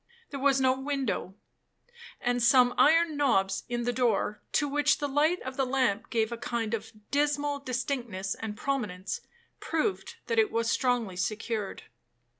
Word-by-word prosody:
There 280 Hz, -, -4 dB
was 275 Hz, 0 st, +3 dB
no 260 Hz, -1 st, +4 dB
window; 265 Hz, -9 st, -2 dB, 0.8 s
and 245 Hz, 0 st, 0 dB
some 245 Hz, +1 st, +5 dB
iron 325 Hz, +1 st, +4 dB
knobs 195 Hz, -9 st, +1 dB
in 240 Hz, 0 st, -1 dB
the 245 Hz, +1 st, 0 dB
door, 235 Hz, -4 st, 0 dB
to 295 Hz, -, +2 dB
which 295 Hz, +1 st, +2 dB
the 290 Hz, -, -2 dB
light 305 Hz, +6 st, +2 dB
of 260 Hz, 0 st, -6 dB
the 270 Hz, -, +2 dB
lamp 255 Hz, -5 st, 0 dB
gave 225 Hz, -1 st, 0 dB
a 235 Hz, -, -3 dB
kind 230 Hz, -1 st, -3 dB
of 220 Hz, -1 st, -3 dB, 0.2 s
dismal 290 Hz, 0 st, +1 dB
distinctness 245 Hz, -7 st, -3 dB
and 215 Hz, -2 st, -6 dB
prominence, 210 Hz, -9 st, -3 dB, 0.4 s
proved 330 Hz, +5 st, -2 dB
that 460 Hz, -1 st, +1 dB
it 430 Hz, -2 st, +3 dB
was 230 Hz, 0 st, 0 dB
strongly 240 Hz, -7 st, 0 dB
secured. 215 Hz, +1 st, -3 dB
250 Hz, 155 wpm, -29 LUFS, 225-285 Hz, 0.8 s, some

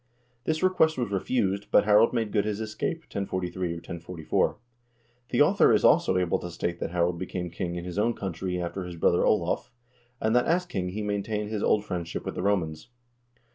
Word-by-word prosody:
This 155 Hz, +2 st, 0 dB
request 160 Hz, -5 st, +3 dB
was 120 Hz, -5 st, -2 dB
refused, 100 Hz, 0 st, 0 dB
but 100 Hz, -, +5 dB
Harald 105 Hz, +2 st, +5 dB
made 115 Hz, -3 st, -1 dB
good 105 Hz, -, +2 dB
his 105 Hz, -1 st, -2 dB
escape, 110 Hz, -, -3 dB
1043 95 Hz, -, -3 dB
or -, -, -2 dB
1044. 85 Hz, -1 st, -2 dB, 0.7 s
The -, -, +2 dB
author -, -, +4 dB
is -, -, +3 dB
also 95 Hz, -, +4 dB
able 90 Hz, -2 st, +1 dB
to 90 Hz, -, -6 dB
state 85 Hz, 0 st, -3 dB
that -, -, -2 dB
Harald 85 Hz, 0 st, 0 dB
became 90 Hz, -2 st, -4 dB
king 85 Hz, 0 st, -3 dB
in 85 Hz, 0 st, -5 dB
his 90 Hz, +2 st, -4 dB
own 115 Hz, +2 st, +2 dB
country 95 Hz, -1 st, -3 dB
after 90 Hz, +2 st, -3 dB
his 90 Hz, -1 st, -7 dB
brother 85 Hz, +1 st, +3 dB
Olav, 90 Hz, +1 st, +1 dB, 0.5 s
and 110 Hz, +1 st, +1 dB
that 125 Hz, -, +3 dB
as 180 Hz, +2 st, +2 dB
king 95 Hz, -, -3 dB
he 105 Hz, +3 st, -4 dB
main 100 Hz, -1 st, -1 dB
tained 105 Hz, 0 st, -3 dB
his 110 Hz, -2 st, -2 dB
old 105 Hz, 0 st, +2 dB
friendship 85 Hz, -4 st, -4 dB
with -, -, -3 dB
the -, -, -4 dB
Romans. 85 Hz, -6 st, -1 dB
95 Hz, 200 wpm, -27 LUFS, 90-110 Hz, 0.7 s, but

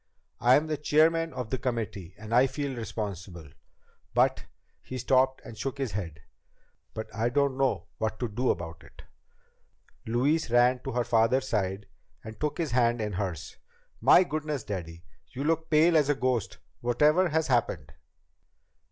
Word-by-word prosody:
"I'm 130 Hz, +5 st, +4 dB
the 155 Hz, -1 st, -2 dB
chairman 160 Hz, +2 st, +2 dB
of 125 Hz, -6 st, -6 dB
the 130 Hz, -, -1 dB
committee, 115 Hz, -8 st, -4 dB
and 110 Hz, +1 st, -7 dB
I 125 Hz, +3 st, +5 dB
feel 140 Hz, -1 st, -4 dB
responsible. 100 Hz, -8 st, -6 dB, 0.7 s
But -, -, +2 dB, 0.2 s
" -, -, -44 dB
He 130 Hz, -, -4 dB
stopped 130 Hz, +2 st, +2 dB
and 115 Hz, -, -9 dB
shook 135 Hz, +4 st, -4 dB
his 135 Hz, -5 st, -2 dB
head. 85 Hz, -7 st, -5 dB, 0.7 s
"But 110 Hz, -, -4 dB
I 115 Hz, +3 st, 0 dB
don't 140 Hz, +1 st, +1 dB
know 130 Hz, -10 st, 0 dB
what 110 Hz, 0 st, -2 dB
to 120 Hz, -, -1 dB
do 120 Hz, +4 st, -1 dB
about 85 Hz, -1 st, -3 dB
it." -, -, -16 dB, 1.0 s
Louise 130 Hz, +7 st, +1 dB
ran 120 Hz, +2 st, +4 dB
to -, -, -3 dB
her 120 Hz, 0 st, +1 dB
father's 120 Hz, +3 st, +2 dB
side 100 Hz, -3 st, -1 dB, 0.4 s
and 110 Hz, 0 st, -10 dB
took 150 Hz, -1 st, -2 dB
his 165 Hz, -4 st, -2 dB
hand 120 Hz, -1 st, +2 dB
in 105 Hz, -2 st, -3 dB
hers. 90 Hz, -5 st, -4 dB, 0.4 s
"My 180 Hz, -, +7 dB
goodness, 150 Hz, -5 st, -3 dB
Daddy! 85 Hz, -4 st, -6 dB, 0.3 s
You 135 Hz, -, -4 dB
look 160 Hz, +1 st, +1 dB
as -, -, -34 dB
pale 160 Hz, +2 st, +4 dB
as 150 Hz, -2 st, +3 dB
a 145 Hz, -, +3 dB
ghost. 130 Hz, -4 st, -1 dB, 0.2 s
Whatever 150 Hz, +9 st, +3 dB
has 160 Hz, 0 st, +1 dB
happened?" 105 Hz, -, -1 dB
120 Hz, 165 wpm, -28 LUFS, 105-145 Hz, 1.0 s, My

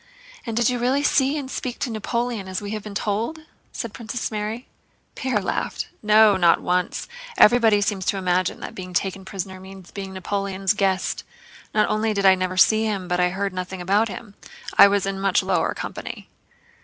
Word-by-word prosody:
"And 225 Hz, -1 st, -3 dB
did 240 Hz, -, +3 dB
you 250 Hz, -1 st, 0 dB
really 260 Hz, +4 st, +1 dB
see 275 Hz, +1 st, +2 dB
and 270 Hz, -2 st, -5 dB
speak 245 Hz, -2 st, -4 dB
to 250 Hz, -, -3 dB
Napoleon, 230 Hz, -1 st, -2 dB
as 185 Hz, 0 st, -3 dB
we 205 Hz, 0 st, -6 dB
have 215 Hz, -1 st, -3 dB
been 205 Hz, -1 st, -9 dB
told?" 220 Hz, +10 st, -2 dB, 0.3 s
said 230 Hz, -3 st, -5 dB
Princess 230 Hz, +1 st, -4 dB
Mary. 215 Hz, +3 st, -4 dB, 0.5 s
Pierre 260 Hz, -6 st, -1 dB
laughed. -, -, -3 dB
"No, 215 Hz, -1 st, +6 dB
not 175 Hz, -2 st, +4 dB
once! 180 Hz, 0 st, -1 dB, 0.3 s
Everybody 220 Hz, -2 st, +6 dB
seems 200 Hz, -2 st, -1 dB
to 200 Hz, -, +1 dB
imagine 185 Hz, -1 st, 0 dB
that -, -, -6 dB
being 185 Hz, -1 st, -8 dB
taken 190 Hz, +2 st, -2 dB
prisoner 190 Hz, -1 st, -6 dB
means 190 Hz, -1 st, -12 dB
being 195 Hz, -1 st, -6 dB
Napoleon's 195 Hz, 0 st, -1 dB
guest. 190 Hz, -2 st, 0 dB, 0.5 s
Not 215 Hz, -1 st, +2 dB
only 215 Hz, 0 st, 0 dB
did 200 Hz, 0 st, 0 dB
I 190 Hz, -, +8 dB
never 185 Hz, 0 st, -2 dB
see 220 Hz, +3 st, +5 dB
him 200 Hz, -4 st, -2 dB
but 180 Hz, 0 st, 0 dB
I 180 Hz, 0 st, +3 dB
heard 195 Hz, +1 st, -2 dB
nothing 185 Hz, 0 st, -5 dB
about 200 Hz, +5 st, +2 dB
him—I 205 Hz, -1 st, +1 dB
was 200 Hz, -1 st, +1 dB
in 195 Hz, 0 st, -3 dB
much 195 Hz, -1 st, +2 dB
lower -, -, 0 dB
company!" -, -, -7 dB
200 Hz, 185 wpm, -23 LUFS, 190-220 Hz, 0.5 s, I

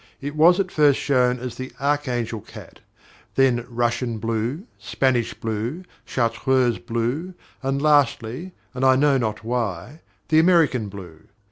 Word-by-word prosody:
It 145 Hz, +2 st, -6 dB
was 170 Hz, +4 st, +5 dB
at 185 Hz, -2 st, -1 dB
first 145 Hz, -3 st, +4 dB
shown 125 Hz, -3 st, +2 dB
as 125 Hz, 0 st, -6 dB
the 130 Hz, 0 st, -7 dB
Archangel 125 Hz, -6 st, -1 dB
cat, -, -, -13 dB, 0.6 s
then 125 Hz, -3 st, +2 dB
Russian 120 Hz, 0 st, -1 dB
blue, 115 Hz, -, -2 dB, 0.2 s
Spanish 125 Hz, -4 st, 0 dB
blue, 115 Hz, -, -4 dB, 0.2 s
Chartreuse 120 Hz, 0 st, +1 dB
blue, 125 Hz, +11 st, -3 dB, 0.3 s
and, 135 Hz, 0 st, -1 dB
lastly, 145 Hz, +1 st, +1 dB, 0.2 s
and 130 Hz, 0 st, -4 dB
I 130 Hz, 0 st, +6 dB
know 140 Hz, 0 st, +3 dB
not 110 Hz, -3 st, -3 dB
why, 120 Hz, -, -3 dB, 0.3 s
the 155 Hz, -, +5 dB
American 160 Hz, -, +3 dB
blue. 90 Hz, -5 st, -11 dB
125 Hz, 135 wpm, -23 LUFS, 115-145 Hz, 0.6 s, I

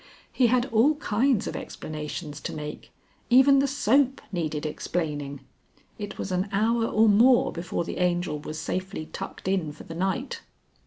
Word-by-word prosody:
He 250 Hz, -, +4 dB
had 245 Hz, +1 st, +3 dB
all 255 Hz, +8 st, +5 dB
kinds 250 Hz, -2 st, +1 dB
of -, -, -4 dB
explanations 150 Hz, 0 st, -6 dB
to -, -, -5 dB
make 150 Hz, 0 st, -7 dB, 0.4 s
even 265 Hz, +3 st, +7 dB
the 280 Hz, -, +2 dB
soap 270 Hz, 0 st, +2 dB
needed 155 Hz, -4 st, -2 dB
explaining. 145 Hz, -3 st, -3 dB, 0.6 s
It 205 Hz, -1 st, -6 dB
was 190 Hz, -, -4 dB
an 185 Hz, +2 st, 0 dB
hour 225 Hz, +3 st, +2 dB
or 220 Hz, +1 st, +4 dB
more 235 Hz, +5 st, +5 dB
before 170 Hz, 0 st, -3 dB
the -, -, -5 dB
Angel 175 Hz, -4 st, 0 dB
was 155 Hz, +1 st, -6 dB
safely 185 Hz, 0 st, -4 dB
tucked -, -, -7 dB
in 185 Hz, -6 st, 0 dB
for -, -, -12 dB
the -, -, -9 dB
night. 190 Hz, +10 st, -2 dB
190 Hz, 160 wpm, -26 LUFS, 155-240 Hz, 0.6 s, even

